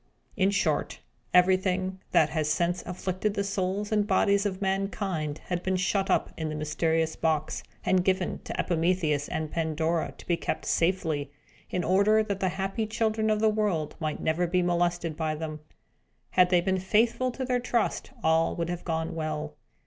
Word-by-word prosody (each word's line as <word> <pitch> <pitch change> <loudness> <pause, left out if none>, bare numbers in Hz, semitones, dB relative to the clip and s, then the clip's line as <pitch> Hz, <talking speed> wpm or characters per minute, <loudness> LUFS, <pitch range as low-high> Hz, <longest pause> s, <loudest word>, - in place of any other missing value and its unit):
In 195 -1 +3
short, 200 - 0 0.3
everything 185 +1 +3
that 155 - +4
has 155 -2 -1
since 175 +3 +1
afflicted 185 +3 -2
the 200 - 0
souls 195 +1 -2
and 210 -1 +2
bodies 200 -1 +3
of 190 -2 -4
mankind 190 -6 -2
had 175 -1 -2
been 190 +1 0
shut 190 +1 0
up - - +2
in 160 -1 -3
the 155 - -4
mysterious 160 +1 0
box, 155 -2 0 0.2
and 185 -1 +3
given 185 -1 0
to - - -5
Epimetheus 165 -4 +1
and 155 -1 -3
Pandora 160 0 0
to - - -13
be 170 - +1
kept - - -3
safely, 165 -5 0 0.4
in 180 - -1
order 210 +3 +4
that 200 -2 -3
the 190 - +1
happy 195 +4 -2
children 220 0 0
of 215 0 +1
the 220 - +5
world 205 -8 0
might 155 -2 -2
never 165 +3 +1
be 180 +1 +1
molested 175 -2 0
by 155 -1 -1
them. 155 0 -5 0.7
Had 180 -1 +5
they 180 -1 +4
been 190 +1 0
faithful 230 +6 +2
to 260 - -3
their 250 -1 +1
trust, 240 -1 -1
all 160 +1 +3
would 170 0 -2
have 175 0 -4
gone 160 -1 -2
well. 155 -1 -3
180 Hz, 175 wpm, -28 LUFS, 160-195 Hz, 0.7 s, the